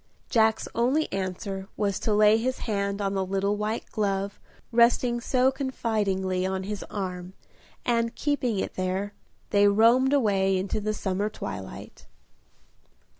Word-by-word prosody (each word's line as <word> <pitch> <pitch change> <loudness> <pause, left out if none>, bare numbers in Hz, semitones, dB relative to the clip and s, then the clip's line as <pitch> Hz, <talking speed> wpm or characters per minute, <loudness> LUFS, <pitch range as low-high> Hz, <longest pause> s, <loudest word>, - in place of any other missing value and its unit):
Jack's 220 -2 +3
only 260 +7 +2
answer 190 0 -4
was 200 -2 0
to 220 - -1
lay 210 +1 +5
his 255 +3 -2
hand 200 -2 -1
on 195 0 0
the 195 -1 0
little 195 +2 0
white 210 +2 -2
glove 200 -1 -1 0.3
resting 240 +1 +3
so 255 +2 +2
confidingly 210 -8 -1
on 190 0 -2
his 205 0 -4
arm, 185 -2 -5 0.5
and, 230 -1 +1
keeping 260 -7 0
it - - -2
there, 190 +2 -2 0.4
they 205 0 +5
roamed 230 +6 +5
away 195 -8 +2
into 195 +3 -2
the 215 +1 -1
summer 200 +1 -1
twilight. - - -8
205 Hz, 135 wpm, -26 LUFS, 195-230 Hz, 0.5 s, lay